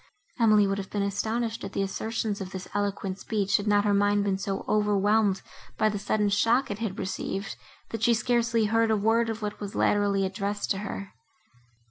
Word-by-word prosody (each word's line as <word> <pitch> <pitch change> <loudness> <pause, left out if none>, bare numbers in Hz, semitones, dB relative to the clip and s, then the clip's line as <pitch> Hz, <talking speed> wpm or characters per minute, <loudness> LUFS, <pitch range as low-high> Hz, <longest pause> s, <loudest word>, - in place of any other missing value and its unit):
Emily 215 -3 +5
would 195 0 -1
have 195 - -6
been 205 -1 -1
astonished 220 +3 -2
at - - -6
the 195 - 0
assertions 215 +1 -3
of 190 - -5
this 185 -1 -7
eloquent 200 -1 -2
speech, 200 -3 +1
had 205 0 -4
not 205 0 +3
her 205 - +3
mind 205 0 +3
been 195 -1 0
so 195 0 -3
overwhelmed 210 -1 +2 0.3
by 215 - +3
the 205 -1 -3
sudden 210 0 +1
shock 230 +5 +2
it 205 - -4
had 215 -4 -3
received, 195 +1 -4 0.3
that 225 - -5
she 235 0 +4
scarcely 230 0 +1
heard 225 +1 +2
a 220 - +3
word 225 +3 +2
of 225 -1 -4
what 210 0 -4
was 205 -1 -6
latterly 200 -1 +2
addressed 200 +2 -3
to 195 - 0
her. 200 -1 -6
205 Hz, 195 wpm, -27 LUFS, 200-220 Hz, 0.3 s, Emily